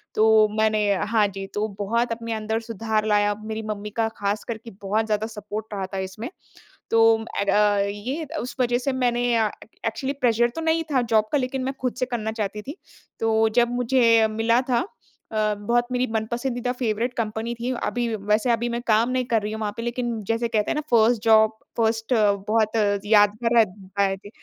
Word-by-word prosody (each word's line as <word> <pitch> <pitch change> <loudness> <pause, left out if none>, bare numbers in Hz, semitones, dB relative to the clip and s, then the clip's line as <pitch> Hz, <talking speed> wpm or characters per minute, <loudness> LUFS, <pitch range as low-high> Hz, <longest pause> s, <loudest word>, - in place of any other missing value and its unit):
तो 220 0 +5
मैंने 215 0 +2 0.3
हाँ 215 -2 +3
जी, 195 0 -6
तो 210 +2 -2
बहुत 230 +4 0
अपने 230 0 -3
अंदर 220 +1 -2
सुधार 220 -1 -2
लाया, 205 -1 +3
मेरी 220 0 -4
मम्मी 210 -1 -5
का 225 - +2
ख़ास 205 +1 -1
करके 230 0 -6
बहुत 210 +3 0
ज़्यादा 215 0 -1
सपोर्ट 210 -1 -6
रहा 195 -2 -2
था 195 - -2
इसमें, 215 +7 -7 0.6
तो 225 0 +5 0.2
एण्ड 200 - -1
अ, 205 -1 +3
ये 255 +11 -4
उस 245 +1 -5
वजह 245 0 +2
से 265 +2 -2
मैंने 245 -2 +1
अ, 220 -1 +3 0.2
ए - - -25
एक्चुअली 265 +5 -2
प्रेशर 240 -1 +3
तो 325 - -3
नहीं 325 0 +1
था 260 - +3
जॉब 215 -1 +4
का 295 - +3
लेकिन 255 0 -2
मैं 270 - -2
ख़ुद 250 -1 -1
से 255 - +1
करना 230 -3 -3
चाहती 210 +1 -3
थी। 285 +9 -8 0.4
तो 225 0 +2
जब 240 0 +2
मुझे 230 -3 +4
मिला 225 +3 +2
था 240 -1 +3 0.5
अ, 215 -1 +1
बहुत 240 +4 0
मेरी 250 0 +1
मनपसंदीदा 240 +3 -2
फेवरेट 235 +1 -1
कंपनी 225 +1 -2
थी, 245 +2 -2
अभी 240 -2 -1
वैसे 210 +4 +1
अभी 235 +1 0
मैं 235 0 -3
काम 225 +2 +3
नहीं 255 -1 0
कर 225 -3 +1
रही 210 - -4
हूँ 220 - -5
वहाँ 210 -1 -2
पे। 230 - -4
लेकिन 240 -2 -2
जैसे 230 +1 0
कहते 215 -2 0
हैं - - -1
ना 300 - 0
1st 230 0 +4
जॉब, 220 -1 +5 0.2
फर्स्ट 225 +1 +1 0.3
बहुत 220 0 +1 0.3
यादगार 215 +2 +3
रहत 195 -3 +1
आये 195 -1 +2
थे। - - -8
225 Hz, 200 wpm, -24 LUFS, 215-240 Hz, 0.6 s, तो